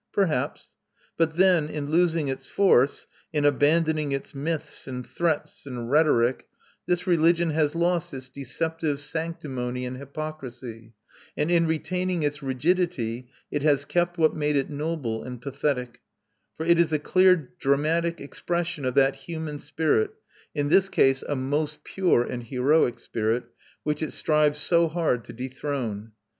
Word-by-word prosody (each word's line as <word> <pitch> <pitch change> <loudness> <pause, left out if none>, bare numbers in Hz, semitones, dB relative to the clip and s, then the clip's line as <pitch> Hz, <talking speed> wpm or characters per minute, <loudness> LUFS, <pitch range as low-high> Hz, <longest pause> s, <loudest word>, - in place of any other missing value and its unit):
Perhaps: 160 -11 -1 0.4
but 160 -1 +1
then, 175 -4 +4
in 145 -1 -4
losing 165 -2 +2
its 135 -1 -4
force, 145 -9 +3 0.3
in 150 -2 0
abandoning 150 +1 +2
its 135 - -4
myths, 150 +2 -4
and 125 -2 -5
threats, 160 -4 -2
and 120 -2 -5
rhetoric, 135 -5 +3 0.4
this 180 0 0
religion 170 -1 +3
has 150 0 +1
lost 175 0 +1
its 130 -1 -7
deceptive 145 +3 -3
sanctimony 135 -6 -4
and 125 +1 -5
hypocrisy; 130 -6 -7 0.4
and 150 +3 0
in 170 -1 +4
retaining 180 +2 -1
its 145 +1 -1
rigidity 130 -4 -1 0.2
it 145 - -1
has 145 -1 +3
kept 175 +3 0
what 160 -1 +3
made 150 -1 0
it 140 +1 0
noble 145 -7 -2
and 125 -1 -7
pathetic; 130 -2 -2 0.6
for 160 - -3
it 170 0 +4
is 170 -2 +3
a 155 - +3
clear 180 -1 +3
dramatic 160 +4 +1
expression 170 +1 -3
of 130 - -1
that 135 0 +4
human 155 +1 -6
spirit 160 - +1 0.5
in 145 0 0
this 190 +3 +4
case 135 -6 +3
a 145 - 0
most 145 +3 -2
pure 180 -10 +2
and 120 -1 -5
heroic 130 +2 +2
spirit 115 +2 -1 0.4
which 150 0 -1
it 155 - -2
strives 150 -1 +2
so 170 +3 +3
hard 155 -7 0
to - - -10
dethrone. 125 -4 -4
150 Hz, 150 wpm, -26 LUFS, 130-165 Hz, 0.6 s, then